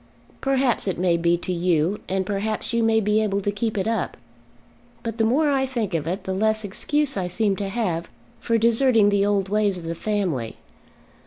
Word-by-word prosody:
"Perhaps 270 -5 +1
it 190 - -1
may 175 -1 +2
be 170 +1 +2
to 180 +1 -3
you, 175 +2 +1
and 190 0 0
perhaps 210 +4 -2
you 235 - +2
may 225 0 +3
be 210 0 +2
able 200 -2 0
to 200 +1 -1
keep 210 +1 -2
it 195 - 0
up. 225 -4 -2 0.9
But 230 0 -5
the - - +3
more 285 +7 +3
I 265 -1 +1
think 230 -7 -3
of 160 -2 -1
it 185 +4 -3
the 190 - -3
less 220 +2 +1
excuse 275 +7 0
I 185 -2 -1
seem 200 +2 0
to 200 -2 -3
have 185 -6 -2 0.3
for 230 -1 +1
deserting 230 -1 +4
the 200 0 +2
old 200 -2 +1
ways 205 -2 +1
of 175 - -8
the 165 0 -3
family. 170 - -2
205 Hz, 200 wpm, -23 LUFS, 185-225 Hz, 0.9 s, deserting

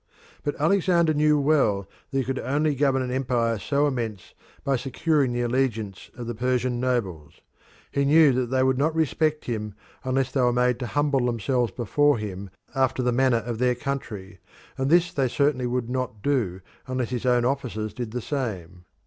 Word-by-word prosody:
But 145 - -3
Alexander 170 0 +3
knew 150 0 +3
well 135 -10 +2 0.2
that 135 - -2
he 135 - +2
could 130 +1 -3
only 150 +3 0
govern 135 -1 +1
an 125 - -4
empire 120 -4 0
so 140 +5 +1
immense 115 -9 -3 0.3
by 140 - +1
securing 140 +2 0
the 120 0 -1
allegiance 115 -5 -1
of 120 - -6
the 120 - -3
Persian 125 +1 0
nobles; 100 - -2 0.6
he 140 - +1
knew 150 +1 +6
that 125 0 0
they 130 +1 +1
would 130 0 +2
not 155 +3 +1
respect 155 -1 0
him 105 -4 -4 0.3
unless 130 0 0
they 135 - +1
were 125 -1 +4
made 125 0 +1
to 125 - -3
humble 140 -2 +1
themselves 120 +1 0
before 145 +4 +2
him 100 -2 -6 0.2
after 130 -1 +1
the 125 - +2
manner 120 -2 +2
of 120 -2 -4
their 125 0 +2
country, 105 -8 -5 0.4
and 135 0 -1
this 175 +2 +4
they 135 -2 +1
certainly 130 0 +1
would 125 -1 -1
not 125 -4 -4
do 110 -11 0 0.3
unless 130 -2 -2
his 125 0 -2
own 125 -1 +3
officers 120 -6 -2
did 120 0 -5
the 120 +2 -4
same. 95 - -4
125 Hz, 185 wpm, -25 LUFS, 115-140 Hz, 0.6 s, knew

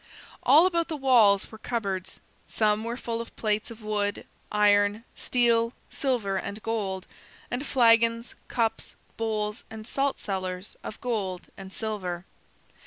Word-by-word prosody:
All 315 +4 +7
about 340 -2 +1
the 315 - -3
walls 230 -8 +5
were 220 - -10
cupboards. 195 -6 -3 0.3
Some 215 0 +1
were 235 +1 -3
full 230 -2 -3
of 230 - -10
plates 210 -1 0
of 230 -1 -11
wood, 205 -1 -1 0.3
iron, 205 +1 +4
steel, 235 -1 +2 0.2
silver, 230 -8 0
and 200 +2 -4
gold, 200 -4 -2 0.5
and 245 +3 -1
flagons, 230 -3 +3
cups, 230 -2 -1 0.2
bowls, 215 -1 -2
and 220 -1 -8
saltcellars 195 -8 -2
of - - -7
gold 200 -7 -2
and 190 -1 -9
silver. 190 -5 -4
220 Hz, 130 wpm, -27 LUFS, 205-235 Hz, 0.5 s, All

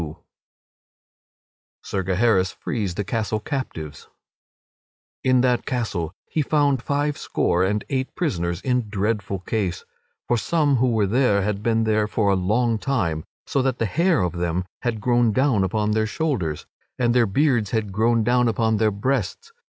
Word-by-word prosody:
[Sidenote: 80 +2 -7 1.6
Sir 95 - -2
Gaheris 95 0 +2
frees 100 -7 -3
the 105 - -1
castle 110 +1 -2
captives] 105 - -5 1.2
In 130 -1 +4
that 125 -1 +1
castle 100 - -2
he 155 - -1
found 145 -3 +2
five 145 +2 -1
score 90 +1 +1
and 105 +2 0
eight 130 -1 -2
prisoners 85 - -1
in 125 -4 0
dreadful 100 -2 -2
case, 95 -3 -2 0.4
for 120 - +2
some 150 -1 +2
who 125 +1 +2
were 110 -3 +2
there 105 -2 +2
had 100 0 -2
been 115 0 +1
there 110 -1 +1
for 105 -1 +1
a - - +3
long 110 +5 +1
time, 90 - -1 0.2
so 135 - 0
that 130 -1 0
the 115 - 0
hair 165 - +2
of 90 -2 -1
them 85 +1 -2 0.2
had 115 -4 -2
grown 120 -1 +2
down 130 -6 +2
upon 105 +3 0
their 110 0 +1
shoulders, 105 - -2 0.3
and 120 -2 +2
their 120 -2 +4
beards 120 -1 +2
had 110 -3 -1
grown 115 +3 +2
down 125 +1 +3
upon 110 -1 +1
their 110 0 +3
breasts. 115 - -2
110 Hz, 160 wpm, -23 LUFS, 95-125 Hz, 1.6 s, In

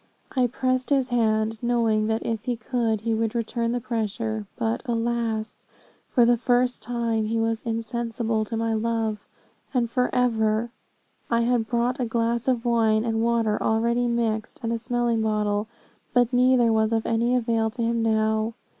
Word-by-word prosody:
I 255 -2 +3
pressed 255 +1 -1
his 270 -3 +2
hand, 220 -2 +1
knowing 230 -3 +1
that 220 0 -1
if 225 -2 -3
he 245 - 0
could, 225 -2 -1
he 225 0 -1
would 225 +1 -1
return 230 0 -1
the 245 - -1
pressure; 220 -2 -3
but, 230 -1 -1
alas! 230 -2 -2 0.4
for 240 - +4
the 240 0 +4
first 245 0 +1
time, 230 -1 -1
he 225 +1 -1
was 225 0 0
insensible 230 -1 -2
to 225 +1 -4
my 225 0 0
love, 220 -1 -1 0.6
and 240 -2 +2
forever. 235 -3 +1 0.6
I 235 0 +2
had 235 -1 +1
brought 240 +2 0
a 250 - 0
glass 235 +1 -1
of 250 -2 +1
wine 225 -2 +2
and 225 -1 0
water 230 -2 +1
already 235 +2 +1
mixed, 225 -2 -1
and 230 0 -1
a 230 - -2
smelling 240 -1 0
bottle, 210 -1 0 0.5
but 245 0 +3
neither 245 -2 +4
was 220 0 +2
of 225 -1 0
any 235 +2 +1
avail 230 -2 +1
to 235 +1 -4
him 230 0 0
now. 220 0 +1
230 Hz, 165 wpm, -25 LUFS, 220-240 Hz, 0.6 s, for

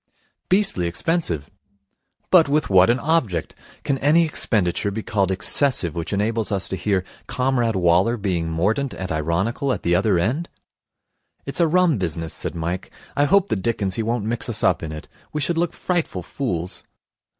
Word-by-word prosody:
'Beastly 185 - +2
expensive.' 85 - -1 0.8
'But 165 -6 +6
with 150 -5 +1
what 95 +2 +6
an 120 - +3
object! 130 - 0 0.3
Can 135 -2 -1
any 160 +4 +4
expenditure 105 - 0
be 105 +2 -5
called 100 -4 0
excessive 95 - +3
which 85 -1 -4
enables 110 +2 -1
us 95 -2 0
to - - -2
hear 95 0 0 0.2
Comrade 125 -4 0
Waller 90 +6 +3
being 90 -6 -2
mordant 105 - 0
and 95 0 -5
ironical 90 - -1
at - - -3
the 85 - +1
other 95 +1 +2
end?' 125 - -1 1.0
'It's 140 - -4
a 170 - +4
rum 170 - +3
business,' 80 -2 -3
said - - -4
Mike. 85 +2 -4 0.3
'I 145 - +3
hope 200 +4 +3
the - - +1
dickens 100 -1 -1
he 115 - -2
won't 115 -1 -1
mix 115 +1 -2
us - - -2
up - - +3
in 80 - -5
it. 75 0 -8 0.3
We 150 - -1
should 165 +3 0
look 175 0 +1
frightful 170 - -2
fools.' 90 -6 -4
105 Hz, 170 wpm, -22 LUFS, 90-140 Hz, 1.0 s, But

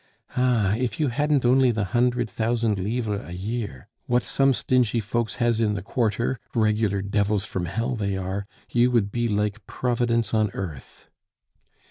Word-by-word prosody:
"Ah, 120 -6 +2
if 120 -3 -2
you 150 -3 +2
hadn't 145 +1 +1
only 130 +1 +5
the 110 -3 0
hundred 120 +4 +1
thousand 115 -2 0
livres 105 +1 -1
a 85 - -9
year, 100 - -4 0.2
what 125 0 +2
some 135 0 +2
stingy 125 -2 +2
folks 110 +2 -2
has 120 -2 +1
in 105 -2 +1
the 100 - -4
quarter 120 +3 0 0.2
(regular 105 -3 +1
devils 100 0 0
from 90 -2 -3
hell 115 +8 -2
they 100 -3 -1
are), 95 +2 -3 0.2
you 120 +1 +4
would 115 -5 +1
be 120 +1 0
like 105 0 -1
Providence 120 -2 0
on 110 -1 +3
earth." 80 -9 -7
115 Hz, 160 wpm, -25 LUFS, 100-120 Hz, 0.2 s, only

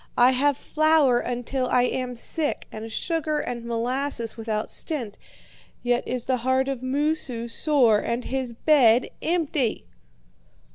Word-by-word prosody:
I 245 +1 +6
have 275 +2 +2
flour 310 -6 +3
until 250 +2 -2
I 250 0 +3
am 250 0 -2
sick, 295 +5 -3
and 220 +1 -7
sugar 315 +2 -1
and 240 -4 -4
molasses 235 +1 -2
without 220 -2 -3
stint, 245 -11 -4 0.7
yet 245 0 0
is 250 -1 -2
the 260 -1 +1
heart 260 +2 +1
of 270 -3 -3
Moosu 260 -3 -1
sore 240 -4 +3
and 235 +3 -2
his 260 -2 -2
bed 250 -3 +4
empty.' 315 -8 0
255 Hz, 135 wpm, -25 LUFS, 235-285 Hz, 0.7 s, I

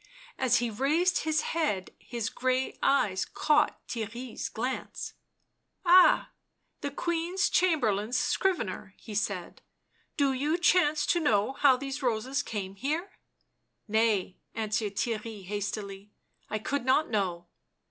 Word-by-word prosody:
As 255 -2 +3
he 240 -1 -1
raised 310 - +1
his 310 -1 +2
head 295 - -1
his 235 -3 -4
grey 255 +1 0
eyes 210 -9 +2
caught 300 0 +1
Theirry' 235 +1 -5
s - - -4
glance. 255 +3 -4
Ci - - -21 0.7
Ah! 360 +1 +6 0.5
the 285 - -3
Queen's 345 +5 -1
Chamberlain's 245 - +2
scrivener," 225 - -1
he 220 - -10
said. 200 -3 -2
xc - - -42
Do 280 -2 +3
you 295 +6 0
chance 340 -4 +3
to 345 - +2
know 225 -5 +2
how 270 -2 +4
these 275 +2 -5
roses 255 +3 0
came 200 -8 -5
here?" 310 - -2 0.4
" - - -50 0.3
Nay," 215 -4 +1 0.2
answered 215 -2 -1
Theirry 220 -2 -3
hastily. 200 0 -4 0.2
" - - -44
I 215 - -1
could 270 +5 -2
not 260 +4 +2
know." 180 -5 -1
250 Hz, 135 wpm, -29 LUFS, 210-295 Hz, 0.7 s, Ah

